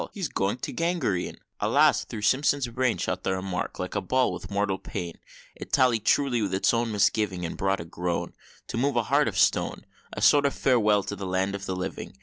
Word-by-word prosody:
He's 190 -7 -3
going 100 +5 -1
to - - -6
gangrene!" 165 - -1 0.2
Alas! - - +3
through 105 - -7
Simpson's 140 +3 +2
brain 125 -2 0
Shot 90 +1 -2
the 95 - -1
remark, 95 -1 -4
like 90 -1 -4
ball, 130 0 +2
with - - -8
mortal 100 -1 -1
pain; 85 -4 -6 0.4
It - - -10
tallied 120 -4 +3
truly 135 -5 +2
with 100 -3 -1
his 95 - +2
own 115 0 0
misgiving, 105 -3 +1
And 85 - -5
brought 95 0 0
a - - -8
groan, 85 +1 -3 0.4
To - - -3
move 135 +3 +1
a 120 - +2
heart - - +2
of - - -3
stone - - +1 0.3
A - - -5
sort 145 -1 +6
of 140 - -3
farewell 105 -6 +3
to 100 - -5
the 100 -1 -6
land 95 +2 0
of 100 -1 -6
living! 90 -7 -5
105 Hz, 205 wpm, -26 LUFS, 95-125 Hz, 0.4 s, sort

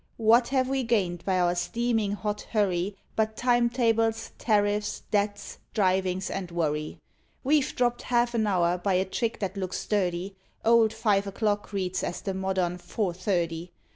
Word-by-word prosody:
what 230 +2 +5
have 260 -1 +1
we 270 0 0
gained 190 -8 0
by 185 -2 +1
our 175 -1 +3
steaming 220 +3 0
hot 210 0 -3
hurry, 195 -2 +1 0.2
But 220 0 0
time 240 -1 +3
tables, 225 -2 +1
tariffs, 210 -1 +1
debts, 205 0 -1 0.2
drivings, 190 -2 +1
and 190 -2 -4
worry? 155 -3 -2 0.5
We've 285 +1 +2
dropped 240 -1 +1
half 240 0 +1
an 220 -2 +1
hour 180 -2 +2
by 190 +1 +1
a 185 +1 +2
trick 225 +4 -2
that 195 0 -3
looks 185 -1 -3
dirty: 190 -1 -1 0.3
Old 225 -1 +5
five 205 -3 +1
o'clock 205 +1 -1
reads 185 -2 -2
as - - -3
the 195 - -3
modern 190 -2 -1
"four 175 +1 -2
thirty." 175 -2 -2
205 Hz, 160 wpm, -27 LUFS, 185-225 Hz, 0.5 s, what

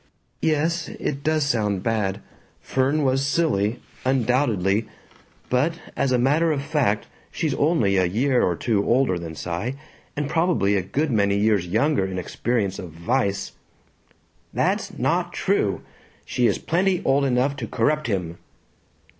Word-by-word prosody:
"Yes, 160 +2 +1
it 140 -1 -4
does 155 -1 +1
sound 105 -8 0
bad. 105 -3 -1 0.4
Fern 135 +3 0
was 135 0 +2
silly, 125 -7 +1 0.2
undoubtedly. 115 -5 +1 0.6
But 135 +7 +1 0.2
as 135 - +1
a 125 - +3
matter 150 +7 +3
of 140 -2 -1
fact 140 -8 0 0.3
she's 155 -4 -1
only 140 - +2
a 95 - +3
year 125 +8 +2
or 90 - +1
two 105 +2 0
older 120 -7 +2
than 80 -1 -7
Cy 85 - -3 0.4
and 145 -1 -1
probably 160 - +2
a 95 - +2
good 140 - -1
many 100 -3 +2
years 105 -4 +2
younger 115 - +2
in 95 -1 -5
experience 100 +1 -1
of 90 - -7
vice." 100 - -1 1.0
"That's - - -1
not - - 0
true! - - 0 0.4
She 120 - +1
is - - +1
plenty 180 +2 0
old 140 +1 +3
enough 135 +1 +1
to - - -4
corrupt 150 -2 0
him! 90 -6 -3
125 Hz, 145 wpm, -23 LUFS, 100-145 Hz, 1.0 s, a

